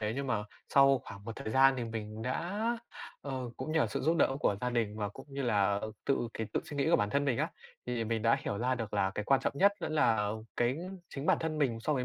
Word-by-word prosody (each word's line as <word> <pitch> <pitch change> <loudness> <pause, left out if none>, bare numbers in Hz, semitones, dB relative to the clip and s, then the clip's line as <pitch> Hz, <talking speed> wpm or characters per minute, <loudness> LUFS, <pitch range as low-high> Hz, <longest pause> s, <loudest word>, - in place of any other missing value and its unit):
thế 105 0 -1
nhưng 140 0 -2
mà 105 -4 0 0.2
sau 135 -1 +6
khoảng 100 0 -10
một 115 - -6
thời 110 - -5
gian 135 +3 +6
thì 120 - -2
mình 110 -1 -5
đã 170 - -2 0.6
ờ, 130 -3 -4
cũng 155 - -4
nhờ 160 -7 +3
sự 105 - -3
giúp 165 +4 +2
đỡ 135 -3 +3
của 100 - +2
gia 125 0 0
đình 110 -3 0
và 105 -1 -1
cũng 135 +7 -12
như 140 0 -3
là 100 -4 +2 0.3
tự 120 -4 +1
cái 110 - -3
tự - - +1
suy 145 - -7
nghĩ 140 +4 +2
của - - +6
bản 105 0 0
thân 145 0 +1
mình 130 -5 +1
á, - - 0 0.4
thì 120 -2 -1
mình 110 0 -1
đã 115 - +4
hiểu 100 - -3
ra 130 +2 +1
được 110 -3 -4
là 95 -1 +2
cái 105 - -2
quan 135 +2 +4
trọng - - 0
nhất 200 +1 +6
vẫn - - -3
là 110 -8 +3 0.3
cái 120 +3 +2 0.4
chính 140 +3 -4
bản - - +5
thân 160 -1 -2
mình 120 -6 +1
so 150 - 0
với 130 -3 0
120 Hz, 270 wpm, -32 LUFS, 110-140 Hz, 0.6 s, sau